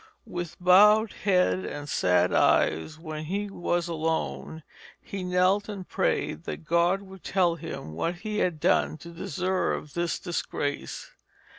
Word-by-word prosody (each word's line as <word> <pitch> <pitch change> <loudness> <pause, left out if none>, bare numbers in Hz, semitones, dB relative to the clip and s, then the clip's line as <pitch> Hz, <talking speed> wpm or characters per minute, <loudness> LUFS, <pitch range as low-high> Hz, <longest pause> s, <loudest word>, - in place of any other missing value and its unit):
With 175 -6 -5
bowed 210 +4 +6
head 185 -2 +2
and 145 0 -6
sad 90 -7 +2
eyes 120 - +2
when 155 -1 -6
he 200 +4 -3
was 175 -2 -1
alone, 160 -1 -2 0.4
he 195 - -6
knelt 185 +3 +2
and 195 -3 -6
prayed 80 +2 -1
that - - -6
God 170 +4 +2
would 190 -1 -13
tell 180 -3 +2
him 160 - -7
what 165 - -1
he 210 +3 -4
had 170 -4 0
done 155 - +2
to 170 +3 -11
deserve 170 -2 -2
this 170 +1 -1
disgrace. 145 -5 -4
175 Hz, 140 wpm, -27 LUFS, 155-190 Hz, 0.4 s, bowed